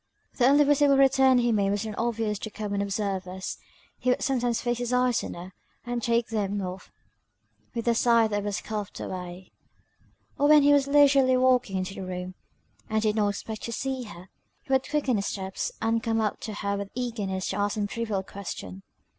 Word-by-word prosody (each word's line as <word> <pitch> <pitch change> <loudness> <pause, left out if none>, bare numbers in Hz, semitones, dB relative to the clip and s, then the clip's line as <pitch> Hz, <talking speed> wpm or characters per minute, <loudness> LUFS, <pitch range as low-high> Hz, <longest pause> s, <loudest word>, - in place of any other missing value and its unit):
The 250 - +4
only 285 +2 +6
visible 285 -1 +4
return 265 -1 +5
he 240 -1 +2
made 200 -3 +2
was 205 +2 -1
not 215 - -4
obvious 225 -3 -1
to 215 - -5
common 205 -2 -3
observers. 190 -2 -3 0.4
He 255 - 0
would 250 - +1
sometimes 245 -4 0
fix 240 0 -1
his 245 0 -2
eyes 250 -1 +2
on - - -6
her, 180 +2 -9 0.3
and 240 0 -2
take 235 0 +1
them 205 -2 -1
off 185 0 -6 0.8
with 230 0 -3
a 235 - +5
sigh 230 -1 +4
that 205 -1 -2
was 205 0 -2
coughed 210 -3 -5
away; 180 0 -7 0.9
or 290 - +4
when 300 -1 +7
he 290 0 +6
was 280 -1 +3
leisurely 280 -2 +5
walking 250 -6 +2
into 185 +1 -3
the 195 - -7
room, 180 0 -5 0.6
and 220 0 0
did 215 -1 +1
not 210 -2 +2
expect 215 +2 -5
to 235 - -5
see 260 +1 -3
her, 185 -3 -12 0.3
he 270 - -3
would 265 0 +1
quicken 280 -6 +1
his 200 - -2
steps, 190 -1 -3
and 225 0 +1
come 225 -2 0
up 215 -1 -1
to 215 -2 -6
her 200 -1 -2
with 200 0 -5
eagerness 210 -7 -3
to - - -3
ask 205 0 0
some 210 -1 -1
trivial 210 -2 -3
question. 135 - -7
220 Hz, 200 wpm, -27 LUFS, 200-250 Hz, 0.9 s, when